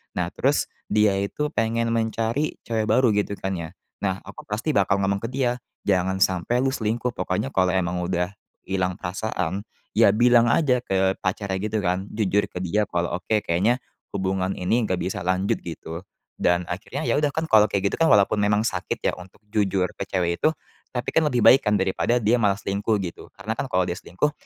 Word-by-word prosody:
Nah, - - -1
terus - - 0 0.2
dia 105 -2 +3
itu 150 +10 -2
pengen 115 +1 0
mencari 115 +5 0
cewek 110 -2 -1
baru, 125 -1 +4
gitu, 105 0 0
kan, 95 -1 -4
ya. 85 +2 -7 0.2
Nah, 95 -1 -2
aku 100 - -11
pasti 110 +9 -1
bakal 100 -8 +2
ngomong 100 0 +1
ke 115 - -4
dia, 125 -1 -1 0.2
"Jangan 95 -1 +2
sampai 95 +7 +1
lu 135 - +2
selingkuh! 120 0 -1
Pokoknya 65 - -2
kalau 95 -1 +2
emang 90 -1 0
udah 90 +1 -1 0.3
hilang 95 -1 -1
perasaan, 95 +1 -3 0.3
ya, - - +6
bilang 120 +1 +5
aja 125 0 +3
ke 95 -4 +1
pacarnya, 95 0 -2
gitu, 110 +1 -1
kan. 90 +2 0
Jujur 105 -1 +1
ke - - -8
dia 100 +4 +1
kalau, 85 0 -1
oke, 105 +4 0
kayaknya 100 +9 +2 0.4
hubungan 95 0 -1
ini 115 +7 +1
nggak 95 - 0
bisa 95 +3 -2
lanjut." 95 +2 0
Gitu. 85 0 -7 0.4
Dan 90 0 +2
akhirnya, 115 - -4
ya, - - +2
udah, 150 -1 +2
kan, 160 - 0
kalau 105 -1 +6
kayak, 100 0 0
gitu, - - +1
kan, 165 - +4
walaupun 105 0 +4
memang 105 +1 +2
sakit, 95 -5 -2
ya, - - +2
untuk 90 +2 -13
jujur 100 -3 +1
ke - - -4
cewek 85 -2 -1
itu, - - +5 0.4
tapi, 125 0 -2
kan, 160 - +4
lebih 125 -3 +1
baik, 135 - +8
kan, 105 -1 +2
daripada 95 +5 +1
dia 110 +1 +3
malah 100 -2 +3
selingkuh, 105 +1 0
gitu. 85 - -8
Karena, - - -3
kan, - - -4
kalau - - +2
dia - - -1
selingkuh 150 +12 -1
100 Hz, 195 wpm, -24 LUFS, 95-115 Hz, 0.4 s, baik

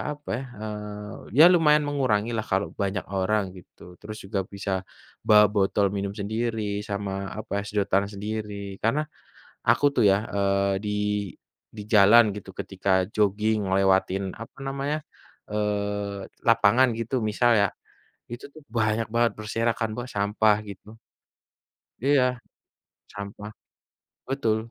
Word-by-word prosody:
apa 145 - -14
ya, - - -6 0.2
eee, 105 0 -6 0.2
ya 155 - +10
lumayan 150 -3 +4
mengurangilah 120 -6 0
kalau 95 +1 +1
banyak 100 0 -2
orang 95 0 0
gitu 90 0 -14
terus 105 +1 -8
juga 95 0 -2
bisa, 100 0 -5 0.6
bawa 105 -1 +8
botol 100 -1 +2
minum 100 0 -3
sendiri 110 0 -2
sama 100 -1 -3
apa 105 -1 -3
sedotan 100 -1 +1
sendiri 100 -1 -5
karena, 140 +8 +1 0.6
aku - - +4
tuh 120 - +3
ya, 95 - +4 0.2
eee, 100 0 +2
di 105 - -1 0.8
di 110 - -9
jalan 110 +2 +7
gitu 100 -2 -8
ketika 95 -1 0
joging 105 +1 +1
lewatin 95 0 +2
apa 115 - -11
namanya, 140 +2 -2 0.5
eee, 100 -1 -2 0.2
lapangan 115 +3 +5
gitu 115 +3 -2
misal 115 +3 +2
ya, 100 - +3 0.6
itu 120 - -7
tuh 155 - -13
banyak 110 -1 0
banget 120 0 +3
berserakan 115 +1 -1
Mbak 120 +1 -5
sampah 105 +1 +3
gitu. 100 +2 -11 1.1
Iya, 140 -1 +4 0.9
sampah, 100 +1 -7 0.8
betul, 130 -5 +1
105 Hz, 125 wpm, -25 LUFS, 100-115 Hz, 1.1 s, ya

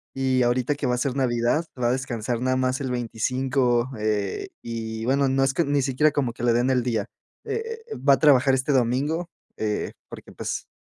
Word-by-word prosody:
y 130 -1 +1
ahorita 120 +3 +1
que 140 - -2
va 125 - +2
a - - -3
ser 130 0 -1
Navidad 125 +4 +1 0.2
va 120 - +3
a - - +2
descansar 120 -3 -3
nada 130 0 +1
más 130 +2 0
el 135 - -2
25, 125 +1 0
eh, 105 -2 -1
y 110 -1 -4
bueno, 135 +2 +2
no 135 +1 +2
es 135 0 +2
que 170 - +2
ni 140 0 +1
siquiera 140 +3 +2
como 135 -5 -1
que 120 - -8
le 120 - +4
den 120 +2 +2
el 125 -1 +2
día. 120 -2 -1 0.4
Eh 455 +1 -4
eh, - - -3
va 140 - +4
a - - +2
trabajar 135 -3 +5
este 135 +2 0
domingo, 140 +7 0 0.3
eh, 105 -1 -2 0.2
porque - - -11
pues - - -4
130 Hz, 210 wpm, -24 LUFS, 120-140 Hz, 0.4 s, trabajar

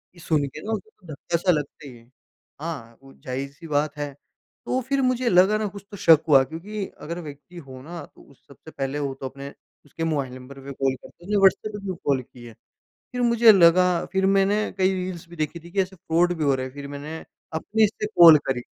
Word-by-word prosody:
ये - - -16
सुन 155 -3 +1
के 155 +3 -10
ना 220 - -3
उसे 215 0 -5
तो 185 - -23
धक्का-सा 170 +5 0
लगता 150 -2 -3
ही 125 - -11
है। 115 - -19 0.6
हाँ, 130 -9 -6
वो 135 - -15
ज़ाहिर-सी 140 +5 -7
बात 150 0 -1
है 145 -1 -4 0.5
तो 255 - 0
फिर 270 +2 -1
मुझे 255 -1 +1
लगा 190 +4 +5
ना 215 -1 -1
कुछ 200 0 -10
तो 205 - -8
शक 160 -3 +6
हुआ 135 -2 +7
क्योंकि 195 +8 -6 0.2
अगर 170 +3 -5
व्यक्ति 155 +4 -11
हो 130 -5 -10
ना, 170 +4 -8
तो 140 - -20
सबसे 140 +4 -16
पहले 135 +2 -3
वो 140 -2 -2
तो 135 0 -9
अपने 140 +1 -9 0.4
उसके 165 +3 -6
मोबाइल 140 -6 -1
नंबर 130 +2 -11
पे 140 +1 -8
कॉल 135 0 0
करता, - - -16
उसने 205 +2 0
व्हाट्सएप 195 +2 +3
पे 210 - -5
क्यों 185 -2 -3
कॉल 135 -2 +2
की 120 0 -16
है। 115 - -11 0.6
फिर 250 - -3
मुझे 235 -1 +6
लगा, 180 -1 +5
फिर 190 0 +2
मैंने 195 +1 +3 0.2
कई 190 0 +3
रील्स 180 -2 -5
भी 175 - -12
देखी 155 +2 -3
थी 170 +1 -14
कि 195 +1 0
ऐसे 190 0 -8
फ्रॉड 170 +2 +1
भी 155 - 0
हो 140 -1 +3
रहा 130 0 -3
है 130 - -9
फिर 140 0 -8
मैंने 145 +3 -7 0.4
अपने 215 +7 +2
से 210 0 -4
कॉल 165 -3 +10
करी, 130 -2 -1
165 Hz, 225 wpm, -24 LUFS, 140-190 Hz, 0.6 s, कॉल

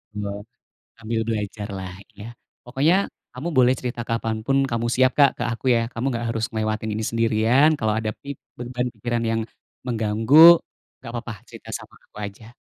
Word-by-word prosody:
Iya, 105 -1 -3 0.7
sambil 115 0 -2
belajar 105 -2 -3
lah, 95 -1 -6 0.3
ya. 105 - -8 0.4
Pokoknya 135 +8 +2 0.4
kamu 135 +7 -5
boleh 125 0 +6
cerita 120 -1 -4
kapan 115 -1 -1
pun 135 +2 +2
kamu 115 0 -1
siap 130 0 +4
Kak 140 -2 +7
ke - - -1
aku 115 - -7
ya, - - +3
kamu 115 +1 -4
nggak 120 -1 -3
harus 115 -1 -1
ngelewatin 110 0 -2
ini 110 +1 -3
sendirian, 115 +5 +3
kalau 110 -2 +1
ada 110 -1 -1
pip 140 -1 -6 0.2
beban 125 0 -3
pikiran 120 -1 -2
yang 115 0 0 0.5
mengganggu, 120 +9 +6 0.4
nggak 115 - -9
apa-apa 120 0 -5
cerita - - -13
sama - - -7
aku - - -32
aja. 110 +4 -11
115 Hz, 170 wpm, -23 LUFS, 110-125 Hz, 0.7 s, Kak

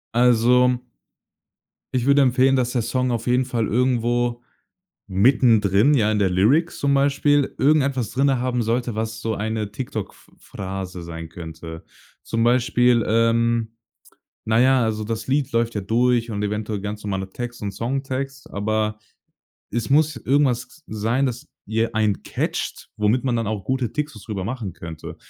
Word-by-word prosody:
Also 125 +1 +4 1.1
ich 125 -2 0
würde 140 +1 +5
empfehlen, 130 +1 +4
dass 125 -2 0
der 125 -2 0
Song 130 +2 -1
auf 115 0 -3
jeden 125 +1 +2
Fall 120 -4 -1
irgendwo 120 0 +1 0.7
mittendrin, 110 +3 +4
ja 110 -4 +3
in 105 - +1
der 95 -2 +2
Lyrics 125 - +2
zum 140 0 +1
Beispiel, 140 0 +2
irgendetwas 135 -5 +2
drinnen 135 0 +2
haben 125 -1 -1
sollte, 120 +1 -1
was 110 0 -3
so 115 -1 -2
eine 110 0 -3
TikTok 110 -4 -5
Ph - - -22
Phrase 95 -2 -6
sein 80 -1 -7
könnte. 80 0 -9 0.4
Zum 115 0 -1
Beispiel, 120 -1 +3
ähm, 115 0 +1 0.7
na 110 +1 +2
ja, 130 -1 +4
also 110 -1 -1
das 110 +1 -4
Lied 140 0 0
läuft 115 0 0
ja 105 - -1
durch 120 +3 +1
und 105 -1 -3
eventuell 105 0 -2
ganz 105 +1 -5
normaler 95 -2 -3
Text 120 0 -6
und 100 - -2
Songtext, 135 +3 -4
aber 105 +1 -1 0.7
es 120 +3 -3
muss 155 0 +3
irgendwas 135 +3 0
sein, 115 +6 0
dass 125 +3 -5 0.2
ihr 115 +2 -1
ein 105 -3 +1
catcht, - - -4
womit 110 +5 +1
man 125 -2 +1
dann 115 -2 -1
auch 105 -3 -3
gute 130 -4 -1
TikToks 150 -8 -4
drüber 100 -5 -4
machen 110 -6 -4
könnte. 80 -2 -8
115 Hz, 155 wpm, -22 LUFS, 105-130 Hz, 1.1 s, würde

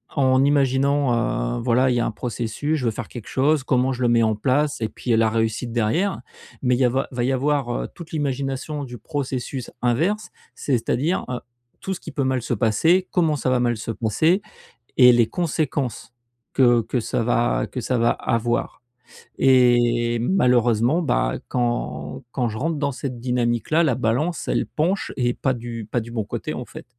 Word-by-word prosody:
en 130 -1 +3
imaginant, 135 - +1
heu, - - -3
voilà, 125 +2 +3
il 125 - +1
y - - +1
a - - +1
un - - -1
processus: 120 +6 -3
«Je 125 - -3
veux 115 - +2
faire - - -6
quelque 120 -4 -9
chose, 140 +2 +2
comment 130 0 +1
je 125 - -6
le 125 - +3
mets 115 -1 +4
en 110 -1 +2
place?» 140 +4 0
et 110 - -1
puis, 125 - -4
heu, 110 - +4
la 115 -1 +3
réussite 115 +2 -1
derrière. 125 - 0 0.4
Mais 125 -1 +2
il - - -2
y 130 - +4
a 125 - +4
va 130 +2 -1
va 120 -1 -2
y 130 - +1
avoir, 140 -1 0
heu, - - -5
toute 170 -2 -11
l'imagination 140 0 -2
du 120 -2 -8
processus 130 0 -4
inverse, 165 - 0 0.3
c'est-à-dire, 140 +6 0
heu, 125 -1 -3 0.4
tout 190 - -3
ce 180 - -7
qui 160 - -9
peut 140 0 -1
mal 130 -1 0
se 120 - -2
passer, 160 - +2
comment 160 -4 +2
ça 130 -2 -1
va 125 -1 +2
mal 120 -2 +1
se 115 - -4
passer 155 - +1 0.6
et 125 -2 +8
les 120 -2 +3
conséquences 145 -8 -2 0.4
que 120 -3 +4
que 120 +3 -2
ça 115 - -1
va 120 +1 +1
que 125 - -5
ça 125 +1 -1
va 115 0 +3
avoir. 120 +1 -1 0.6
Et 120 -2 +3
malheureusement, 125 - +2
bah, 100 - +1 0.2
quand 120 - -2
quand 125 -3 -1
je 110 -1 -5
rentre 160 +5 -1
dans 140 -2 -1
cette 130 -2 -5
dynamique 120 -2 -1
là, 165 +2 +4
la 130 -7 +2
balance, 130 +9 -1
elle - - 0
penche 180 +6 -1
et 120 -1 +1
pas 130 - 0
du 115 -2 -6
pas 120 - +1
du 115 +1 -8
bon 110 -3 -2
côté, - - -5
en - - -5
fait. - - -11
125 Hz, 200 wpm, -22 LUFS, 120-140 Hz, 0.6 s, et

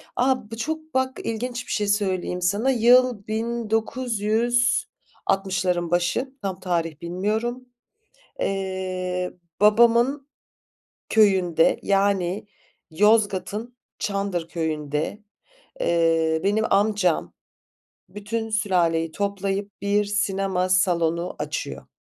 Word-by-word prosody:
A, 250 -3 0
bu 225 - -6
çok 315 +5 -4
bak 260 0 0
ilginç 240 +2 -4
bir - - -6
şey 210 -1 0
söyleyeyim 190 -3 0
sana, 205 +8 +1
yıl 245 -2 +4
1960'ların 225 - -1
başı, 175 +10 0
tam 190 -2 -3
tarih 170 -4 -2
bilmiyorum. 215 +8 -2 0.8
Eee, 185 -2 -2 0.3
babamın 235 +6 +4 0.8
köyünde, 190 -6 +3
yani, 195 -1 +1 0.5
Yozgat'ın 210 +4 +1 0.2
Çandır 195 -4 -2
Köyü'nde, 155 +3 -3 0.6
eee, 165 - +2
benim 210 +2 +2
amcam 195 - +1 0.8
bütün 210 +3 -4
sülaleyi 175 -7 +1
toplayıp 200 +1 -2
bir 205 +1 +2
sinema 195 -2 0
salonu 175 -2 +1
açıyor. - - -4
200 Hz, 85 wpm, -24 LUFS, 180-225 Hz, 0.8 s, yıl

